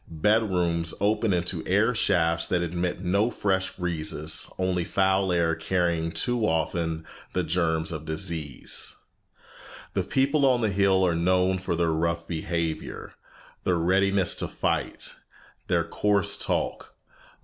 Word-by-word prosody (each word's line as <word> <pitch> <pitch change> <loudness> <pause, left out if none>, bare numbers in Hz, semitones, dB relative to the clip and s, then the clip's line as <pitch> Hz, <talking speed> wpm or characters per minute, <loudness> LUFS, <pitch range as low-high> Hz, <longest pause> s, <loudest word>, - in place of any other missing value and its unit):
Bedrooms 85 -2 +1
open 105 +1 +1
into 90 -2 0
air 105 +6 +3
shafts 85 -6 +2
that 90 -1 +1
admit 85 +2 -2
no 100 +5 +2
fresh 95 -4 -1
breezes, 80 -3 -1
only 95 -1 0
foul 95 +1 +1
air 85 -1 +2
carrying 85 -1 0
too 120 +7 0
often 80 0 -1 0.3
the 90 - 0
germs 80 -1 0
of 80 -2 -5
disease. 80 -2 -3 1.0
The - - +1
people 140 +2 +1
on 125 -2 +3
the 110 -3 +1
hill 95 -1 +3
are 90 - +2
known 90 +2 +2
for 90 -2 -2
their 85 -1 +1
rough 85 +1 -1
behavior, 85 -1 -3 0.5
their 90 -2 +1
readiness 95 +2 +2
to - - -2
fight, - - -2 0.5
their - - +2
coarse 100 -2 +1
talk. - - -2
90 Hz, 130 wpm, -26 LUFS, 85-95 Hz, 1.0 s, air